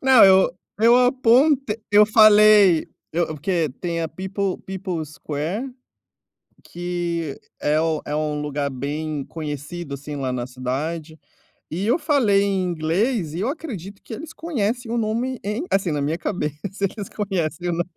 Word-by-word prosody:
Não, 265 -4 +7
eu 190 -1 +6 0.3
eu 230 +2 +6
aponte 250 -1 +3
eu 210 +1 +7
falei, 210 -5 +6 0.3
eu 170 +1 +1
porque 160 +1 -1
tem 170 -2 -2
a 165 - -1
People 190 +2 -3
People's 180 -5 -5
Square, 175 - -4 0.9
que 170 -3 -3 0.2
é 150 +1 +2
o 160 -1 0
é 150 - -3
um 150 -1 -1
lugar 145 -1 -2
bem 145 +2 -4
conhecido, 150 0 -6
assim, 145 +2 -7
lá 135 -3 -2
na 120 -1 -3
cidade, 150 +6 -4 0.5
e 180 +5 -3
eu 240 +9 +2
falei 275 -11 +3
em 195 -2 0
inglês 175 - 0
e 175 - -2
eu 225 - 0
acredito 210 - -7
que 225 - -8
eles 315 +6 -9
conhecem 245 -6 -2
o 240 - 0
nome 235 +3 -1
em 210 +8 -2
Assim, 195 -3 +1
na 145 -1 -1
minha 150 +4 -1
cabeça, 155 -5 -3 0.2
eles 200 0 -2
conhecem 180 -5 -2
o - - 0
nom 170 +1 0
180 Hz, 155 wpm, -22 LUFS, 155-215 Hz, 0.9 s, Não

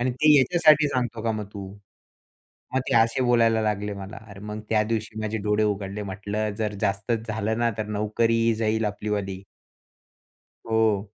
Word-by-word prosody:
आणि 125 +1 +1
ते 150 +5 +4
याच्यासाठी 155 +1 +5
सांगतो 120 -4 -2
का 115 0 0
मग 105 -1 -4
तू?" 100 -2 -7 1.1
मग 130 - +3
ते - - 0
असे 115 +3 +3
बोलायला 115 -2 +3
लागले 105 -1 -1
मला. 100 +2 -8
अरे 100 -1 -11
मग 105 +1 -6
त्या 110 -1 +3
दिवशी 110 0 -3
माझे 110 +1 -2
डोळे 105 +1 +2
उघडले. 100 0 -2
म्हटलं 105 +2 -3
जर 105 -2 -1
जास्तच 110 +3 -1
झालं 110 +1 -1
ना 120 0 +2
तर 110 - -2
नोकरीही 115 +2 +2
जाईल 110 0 0
आपलीवाली. 100 -2 -3 1.2
हो 110 -2 +2
110 Hz, 160 wpm, -25 LUFS, 105-115 Hz, 1.2 s, याच्यासाठी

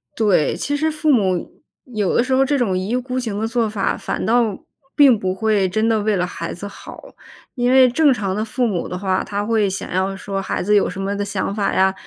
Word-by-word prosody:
对， 200 -9 +2
其 290 - -2
实 310 +2 0
父 305 0 +1
母 190 -8 0 0.2
有 215 -7 -1
的 235 - +4
时 260 +1 -2
候， 265 +1 +4
这 285 +1 +1
种 210 -8 0
一 185 +1 -3
意 240 - 0
孤 255 0 -3
行 220 -5 -3
的 220 - -1
做 230 -1 0
法， 205 -2 -1
反 - - -4
倒 230 -3 +1 0.3
并 275 -6 +6
不 185 -2 -2
会 205 -1 +1
真 215 +4 0
的 220 -2 +2
为 210 0 +1
了 180 -1 0
孩 170 -2 -6
子 200 +4 -7
好。 200 - -12 0.4
因 245 0 0
为 260 -1 +6
正 285 +3 +3
常 195 -5 -2
的 215 - -1
父 245 +2 -1
母 185 -6 -2
的 180 - -5
话， 190 0 -1
他 205 +1 -3
会 220 -2 +1
想 190 - -5
要 190 +2 -1
说 195 0 -4
孩 - - -3
子 210 +3 +2
有 205 - +3
什 185 +2 -6
么 195 +1 -2
的 205 - -2
想 200 -1 -3
法 205 -2 0
呀， 190 0 +3
210 Hz, 265 characters per minute, -20 LUFS, 195-245 Hz, 0.4 s, 并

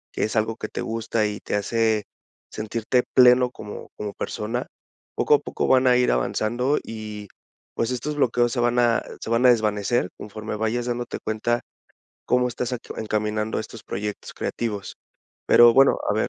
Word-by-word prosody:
es 110 - -1
algo 110 +1 +1
que 110 - -5
te - - -5
gusta 115 -1 -1
y 105 -1 -5
te - - -3
hace 110 0 +1 0.5
sentirte 115 +3 0
pleno 125 0 +6
como 105 -3 -9
como 105 -1 -5
persona, 115 +4 -4 0.5
poco - - +2
a - - +1
poco - - -3
van 130 0 +4
a 125 0 +5
ir 125 - +3
avanzando 120 - 0
y 105 -2 -7 0.5
pues 115 - 0
estos 145 +4 -3
bloqueos 120 -3 +2
se 125 - -1
van 120 0 +1
a 120 -1 +3 0.2
se - - -6
van 120 +2 +3
a - - +8
desvanecer 105 -2 +1
conforme 105 +1 -6
vayas 115 +2 -1
dándote 120 0 -3
cuenta 115 +2 -1 0.7
cómo 125 0 +3
estás 125 +1 -3 0.2
encaminando 105 0 -1
estos 110 0 -9
proyectos 105 +1 -5
creativos. 105 -4 -4 0.5
Pero 120 -1 +7
bueno, 135 +1 +5
a - - +1
ver, 110 - 0
115 Hz, 165 wpm, -24 LUFS, 105-120 Hz, 0.7 s, a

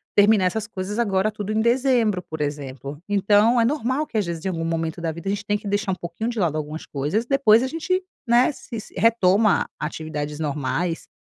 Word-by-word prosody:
terminar 205 -1 +5
essas 210 +4 -1
coisas, 205 -1 -5
agora 205 -3 +2
tudo 210 -1 -5
em 215 - +1
dezembro, 235 -4 +2
por 160 -2 -8
exemplo. 145 -1 -5
Então 205 +4 +4
é 230 - +4
normal 270 +2 0
que, 225 - -4
às 210 - +1
vezes, 170 -1 -5
em - - +1
algum 165 -3 -3
momento 165 0 -2
da 165 -1 -1
vida, 170 +4 -8
a - - +1
gente 200 +1 -2
tem 205 -1 +1
que 205 - -9
deixar 205 0 0
um - - 0
pouquinho 180 +6 -4
de 235 -2 -3
lado 165 -5 +1
algumas 155 +1 -5
coisas, 150 - -1
depois 240 -4 +5
a - - 0
gente, 330 +6 -1 0.3
né, 240 +2 +5
se 235 -3 -7 0.2
retoma 215 -2 +4
atividades 150 -1 -4
normais. 150 +3 -2
200 Hz, 210 wpm, -23 LUFS, 165-225 Hz, 0.3 s, terminar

